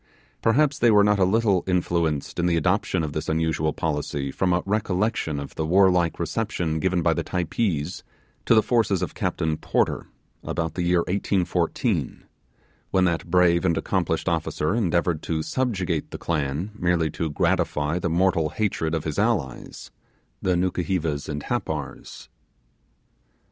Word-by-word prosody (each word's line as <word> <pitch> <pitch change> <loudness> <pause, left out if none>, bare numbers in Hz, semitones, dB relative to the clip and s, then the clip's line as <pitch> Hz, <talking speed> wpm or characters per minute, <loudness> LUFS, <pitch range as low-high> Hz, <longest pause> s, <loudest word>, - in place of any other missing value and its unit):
Perhaps 145 +5 +2
they 120 - +5
were 105 -2 +6
not 105 0 +3
a - - +5
little 100 -2 +2
influenced 85 -5 0
in 85 - +2
the 85 -1 +2
adoption 90 +1 +1
of 75 -2 -4
this 75 - -3
unusual 80 -1 0
policy 75 -3 -2
from 90 +5 0
a 90 +1 +1
recollection 100 -5 0
of 70 - -7
the 80 - -2
warlike 90 0 +3
reception 85 -3 -2
given 95 0 +1
by - - +3
the - - -2
Typees 90 -2 -2 0.4
to - - +5
the 110 - +5
forces 105 -6 +1
of 90 - -4
Captain 80 -1 -1
Porter, - - 0 0.4
about 80 -1 -2
the 90 - -3
year 90 0 +3
1814, 95 0 -1 0.7
when 95 -1 +3
that 85 -1 -1
brave 85 0 +4
and 85 -3 +2
accomplished 85 0 -1
officer 80 0 0
endeavoured 85 -6 +1
to 80 -1 -2
subjugate 95 - -1
the - - -6
clan 75 +4 -2
merely 85 -5 0
to 80 +1 -3
gratify 75 +2 0
the 85 - -1
mortal 85 -2 +2
hatred 85 -5 -1
of 80 - -2
his 75 +1 -3
allies 100 - -2 0.5
the 90 -1 +1
Nukuhevas 85 -4 -1
and 75 -1 -4
Happars. - - -4
85 Hz, 150 wpm, -24 LUFS, 80-95 Hz, 0.7 s, were